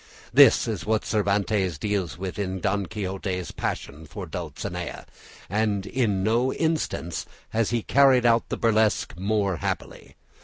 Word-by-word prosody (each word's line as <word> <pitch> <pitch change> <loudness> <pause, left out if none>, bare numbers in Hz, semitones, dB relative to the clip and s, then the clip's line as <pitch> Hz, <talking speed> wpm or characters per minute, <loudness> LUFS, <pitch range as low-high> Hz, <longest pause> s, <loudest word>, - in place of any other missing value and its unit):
This 135 -2 +7
is 105 -8 -3
what 110 0 0
Cervantes 100 -4 +1
deals 100 -1 -2
with 95 +2 -5
in 95 -1 -2
Don 100 +1 0
Quixote's 95 -3 -4
passion 75 +3 -5
for - - -7
Dulcinea, 90 -1 -5 0.4
and 100 0 0
in 105 -7 0
no 120 +5 +2
instance 160 - -2 0.2
has 115 -1 0
he 120 -2 -1
carried 135 -3 +5
out 115 -1 +3
the - - -2
burlesque 110 -7 +2
more 100 0 0
happily. - - -5
105 Hz, 140 wpm, -25 LUFS, 95-115 Hz, 0.4 s, This